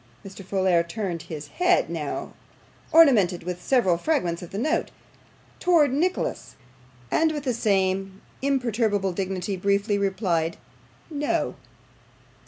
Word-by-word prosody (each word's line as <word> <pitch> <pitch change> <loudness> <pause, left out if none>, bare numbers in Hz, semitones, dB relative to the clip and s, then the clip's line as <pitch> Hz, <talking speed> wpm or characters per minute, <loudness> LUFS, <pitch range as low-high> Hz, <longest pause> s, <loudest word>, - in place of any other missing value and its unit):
Mr. 195 0 -9
Folair 185 -2 +2
turned 170 -1 -4
his 150 -2 -7
head 360 +1 +2
now 160 -3 -4 0.6
ornamented 230 - +5
with 180 0 -5
several 190 -8 +2
fragments 180 - 0
of 175 - -8
the 195 - -6
note 310 +9 0 0.7
towards 320 -7 +4
Nicholas, 350 +6 -1 0.6
and 320 0 +3
with 295 -3 -4
the 255 -3 0
same 195 -3 0 0.2
imperturbable 225 -8 0
dignity, 190 +1 -3
briefly 200 +2 +1
replied 185 -5 0 0.5
'No. 295 -1 -1
200 Hz, 115 wpm, -25 LUFS, 180-265 Hz, 0.7 s, ornamented